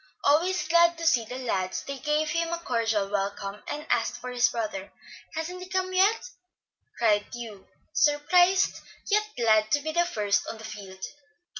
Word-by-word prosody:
Always 350 Hz, +2 st, +2 dB
glad 340 Hz, 0 st, +4 dB
to 330 Hz, -, -5 dB
see 245 Hz, -8 st, +3 dB
the 250 Hz, +3 st, -6 dB
lads, 190 Hz, -8 st, -2 dB
they 275 Hz, -1 st, -6 dB
gave 300 Hz, +1 st, 0 dB
him 335 Hz, +1 st, -1 dB
a 340 Hz, -, -1 dB
cordial 225 Hz, -9 st, 0 dB
welcome, 200 Hz, 0 st, -3 dB
and 300 Hz, +1 st, -5 dB
asked -, -, +1 dB
for 250 Hz, -, -7 dB
his 245 Hz, -1 st, +3 dB
brother. 210 Hz, -4 st, -4 dB, 0.4 s
"Hasn't 350 Hz, +3 st, -4 dB
he 365 Hz, -, -9 dB
come 370 Hz, 0 st, -1 dB
yet?" 400 Hz, +6 st, +3 dB, 0.7 s
cried 210 Hz, -3 st, +2 dB
Hugh, 225 Hz, -5 st, -8 dB, 0.3 s
surprised, 355 Hz, +6 st, +3 dB, 0.3 s
yet 425 Hz, +1 st, +3 dB
glad 220 Hz, -2 st, +3 dB
to 290 Hz, -, +3 dB
be 315 Hz, +2 st, -3 dB
the 345 Hz, +2 st, +2 dB
first 205 Hz, -9 st, 0 dB
on 225 Hz, -, -5 dB
the 220 Hz, -, -12 dB
field. 195 Hz, -3 st, -9 dB
275 Hz, 170 wpm, -27 LUFS, 215-340 Hz, 0.7 s, glad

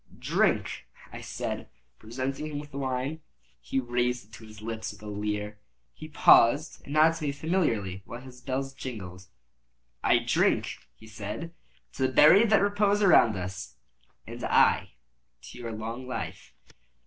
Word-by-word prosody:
"Drink," -, -, 0 dB, 0.3 s
I -, -, -7 dB
said, -, -, -5 dB, 0.3 s
presenting 130 Hz, +6 st, -4 dB
him 145 Hz, -1 st, -4 dB
the 140 Hz, -, -5 dB
wine. 135 Hz, +4 st, -2 dB, 0.4 s
He 135 Hz, -, -2 dB
raised 125 Hz, -1 st, -1 dB
it 105 Hz, -, -28 dB
to 110 Hz, -, -11 dB
his 110 Hz, -1 st, -13 dB
lips 110 Hz, 0 st, -5 dB
with 105 Hz, +1 st, -15 dB
a -, -, -9 dB
leer. 105 Hz, 0 st, -4 dB, 0.3 s
He 155 Hz, -, -10 dB
paused 145 Hz, 0 st, +4 dB
and 140 Hz, -, -8 dB
nodded 160 Hz, +2 st, +5 dB
to 160 Hz, -, -7 dB
me 140 Hz, -, 0 dB
familiarly, 140 Hz, -, -1 dB
while 120 Hz, -, -8 dB
his 130 Hz, -1 st, -13 dB
bells 135 Hz, +1 st, -3 dB
jingled. 95 Hz, -9 st, -8 dB, 0.8 s
"I -, -, +5 dB
drink," -, -, +1 dB, 0.2 s
he 110 Hz, -, -16 dB
said, 110 Hz, +10 st, -7 dB, 0.4 s
"to 130 Hz, -, +1 dB
the -, -, -5 dB
buried 195 Hz, -, +7 dB
that 215 Hz, -2 st, +4 dB
repose 205 Hz, 0 st, +2 dB
around 115 Hz, -, +5 dB
us." 95 Hz, +1 st, -6 dB, 0.5 s
"And -, -, -8 dB
I -, -, +3 dB, 0.5 s
to -, -, -11 dB
your 115 Hz, -1 st, -5 dB
long 115 Hz, +4 st, -6 dB
life." 125 Hz, -, -6 dB
125 Hz, 155 wpm, -28 LUFS, 110-150 Hz, 0.8 s, buried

